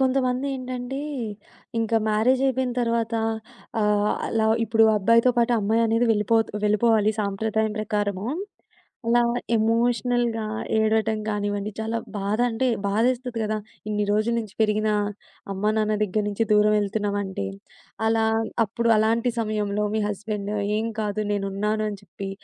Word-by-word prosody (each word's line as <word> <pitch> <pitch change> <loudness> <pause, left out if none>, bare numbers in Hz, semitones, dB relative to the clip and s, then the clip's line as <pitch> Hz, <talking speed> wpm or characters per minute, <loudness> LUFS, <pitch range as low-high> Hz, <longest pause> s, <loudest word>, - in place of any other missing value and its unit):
కొంతమందేంటంటే, 255 0 -1 0.8
ఇంకా 225 0 +1
మ్యారేజయిపోయిన 255 +3 +2
తర్వాత 230 -1 0 0.7
ఆహ్, 210 0 +2 0.2
అలా 220 -1 +1 0.2
ఇప్పుడు 225 0 +4
అబ్బాయితో 230 +4 +4
పాటు 235 +1 +3
అమ్మాయి 220 +3 +2
అనేది 230 +2 +2
వెళ్ళిపోతూ 220 +1 +2
వెళ్ళిపోవాలి 215 0 +3
సాంప్రదాయం 215 +2 -1
ప్రకారము. 205 -2 -1 0.8
అలా 240 +1 +4 0.3
ఎమోషనల్‌గా 235 +1 +1 0.3
ఏడవటం 220 0 +2
గానివ్వండి, 205 -1 -2
చాలా 220 +1 -2 0.2
బాధ 200 +2 -1
అంటే 230 +3 0 0.2
బాధేస్తుంది 240 +3 0
కదా! 215 0 -1 0.3
ఇన్ని 210 -1 0
రోజుల 215 +3 +1
నుంచి 215 -3 -9
పెరిగిన 215 0 +1 0.6
అమ్మా 200 +2 0
నాన్న 215 0 +1
దగ్గర 210 +1 -1
నుంచి 210 +2 0
దూరం 210 0 +5
ఎళ్తున్నామంటే. 200 - -2 0.6
అలా 225 0 +2 0.4
అప్పుడు 235 +3 0
అలాంటి 230 +3 +2
సమయంలో 210 -1 -1
మీ 220 - +1
హస్బెండు 210 0 -3 0.2
ఏం 225 +1 -1
కాదు 210 0 -1
నేనున్నాను 205 +2 -1
అని 205 - -7
చెప్పి 195 +1 -7
220 Hz, 120 wpm, -24 LUFS, 210-230 Hz, 0.8 s, దూరం